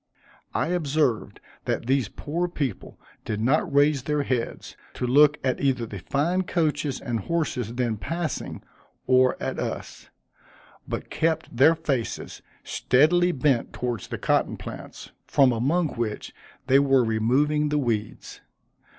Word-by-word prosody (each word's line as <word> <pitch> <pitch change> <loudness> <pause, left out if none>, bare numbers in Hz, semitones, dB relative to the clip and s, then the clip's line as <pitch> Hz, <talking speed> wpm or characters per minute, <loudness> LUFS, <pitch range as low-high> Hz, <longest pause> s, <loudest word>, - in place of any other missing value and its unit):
I - - 0
observed 155 -8 0 0.3
that - - -1
these 130 -4 +1
poor 170 +9 -3
people 140 - -4 0.2
did 105 -1 -3
not 150 - +1
raise 145 0 +3
their 150 +2 -1
heads, 125 -4 -3 0.2
to - - -2
look 145 +4 +5
at 130 -1 0
either 130 -4 +1
the 105 -3 -7
fine 165 - 0
coaches 155 -6 -1
and 120 -4 -3
horses 125 -4 -2
then 120 -3 -1
passing, 165 +8 -4 0.4
or 130 0 +4
at - - -3
us; - - -5 0.8
but - - -5
kept 160 0 -1
their 140 +7 +6
faces 140 -8 -3 0.2
steadily 175 +7 +3
bent 135 -5 +1
towards 120 -4 -3
the - - -5
cotton - - +1
plants, - - -9 0.2
from 135 -3 +4
among 145 +8 +1
which 115 -4 -4 0.3
they 135 +1 +5
were 135 -2 +4
removing 135 +7 +1
the 150 - +1
weeds. 115 -6 -3
140 Hz, 135 wpm, -25 LUFS, 120-155 Hz, 0.8 s, their